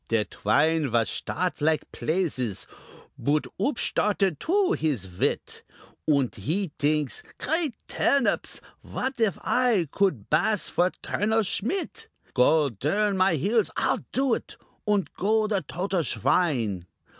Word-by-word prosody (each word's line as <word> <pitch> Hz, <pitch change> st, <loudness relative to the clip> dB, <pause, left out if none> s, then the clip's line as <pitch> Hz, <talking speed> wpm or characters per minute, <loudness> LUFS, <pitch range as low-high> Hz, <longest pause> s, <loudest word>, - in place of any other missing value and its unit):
Der 115 Hz, -2 st, +2 dB
Twine 150 Hz, +7 st, +2 dB
vas 115 Hz, -2 st, +2 dB
shtart -, -, -2 dB
like 155 Hz, +1 st, +1 dB
plazes; 135 Hz, -, -1 dB, 0.5 s
Boot 145 Hz, +4 st, +1 dB
oopshtarted 205 Hz, -, +1 dB
too 385 Hz, +2 st, +2 dB
his 135 Hz, -, -1 dB
wit, -, -, -1 dB, 0.5 s
Und 140 Hz, -5 st, +2 dB
he 160 Hz, -, -1 dB
dinks, 150 Hz, -2 st, +1 dB, 0.2 s
"Great 320 Hz, -6 st, 0 dB
Turnips! 280 Hz, -3 st, +1 dB, 0.2 s
what 260 Hz, 0 st, -4 dB
if 205 Hz, -7 st, +2 dB
I 235 Hz, -9 st, +2 dB
Could 185 Hz, -, 0 dB
bass 210 Hz, +7 st, +2 dB
for 180 Hz, +1 st, +2 dB
Colonel 220 Hz, +2 st, +1 dB
Schmit? 370 Hz, -, -3 dB, 0.3 s
Gaul 145 Hz, +3 st, +4 dB
dern 195 Hz, -, 0 dB
my 185 Hz, -2 st, +3 dB
heels! 210 Hz, -, +1 dB
I'll -, -, +1 dB
do 265 Hz, -2 st, +2 dB
it, -, -, -4 dB, 0.3 s
Und 205 Hz, -3 st, +1 dB
go 215 Hz, +3 st, +2 dB
the 205 Hz, -3 st, 0 dB
total 180 Hz, +3 st, -2 dB
swine! 115 Hz, -, 0 dB
180 Hz, 125 wpm, -26 LUFS, 145-215 Hz, 0.5 s, Gaul